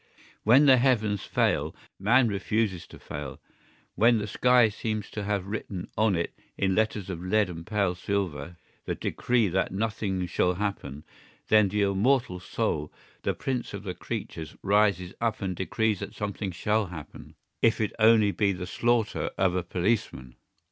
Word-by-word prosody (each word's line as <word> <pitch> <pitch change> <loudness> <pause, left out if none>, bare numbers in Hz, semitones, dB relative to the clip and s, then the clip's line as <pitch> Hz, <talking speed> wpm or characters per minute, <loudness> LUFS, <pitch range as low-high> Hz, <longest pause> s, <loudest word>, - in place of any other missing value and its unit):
When 130 +7 +6
the 130 -2 +7
heavens 110 -6 +1
fail - - 0 0.2
man 120 +6 +4
refuses 100 -3 -1
to - - -13
fail; 70 -3 -7 0.5
when 115 +1 +4
the 105 - -2
sky 125 +3 +4
seems 110 0 -4
to 105 -2 -4
have 100 -2 -1
written 100 -3 -5
on 110 -2 +2
it, 85 0 -2 0.2
in 95 -1 +1
letters 105 -1 0
of 85 -1 -6
lead 100 0 +1
and 85 0 -9
pale 100 -4 +1
silver, 90 -4 -3 0.3
the - - -2
decree 120 -3 0
that 95 +2 0
nothing 100 -2 -2
shall 90 +1 +1
happen, 95 -7 -4 0.5
then 105 -2 +5
the 105 +1 +1
immortal 100 +1 +1
soul, 75 -3 -2 0.3
the - - -1
prince 125 -5 -3
of 100 - -7
the 95 -3 -4
creatures, 80 -2 -6
rises 100 -3 +2
up 115 -1 0
and 95 -3 -3
decrees 105 +3 0
that - - -7
something 100 -1 -3
shall 105 +4 0
happen, 80 -4 -10 0.3
if 115 - +3
it 110 -2 0
be - - -18
only 110 -2 +6
the 100 -3 0
slaughter 115 +3 0
of 95 -1 +2
a 90 - +1
policeman. 90 - -2
100 Hz, 160 wpm, -27 LUFS, 90-110 Hz, 0.5 s, the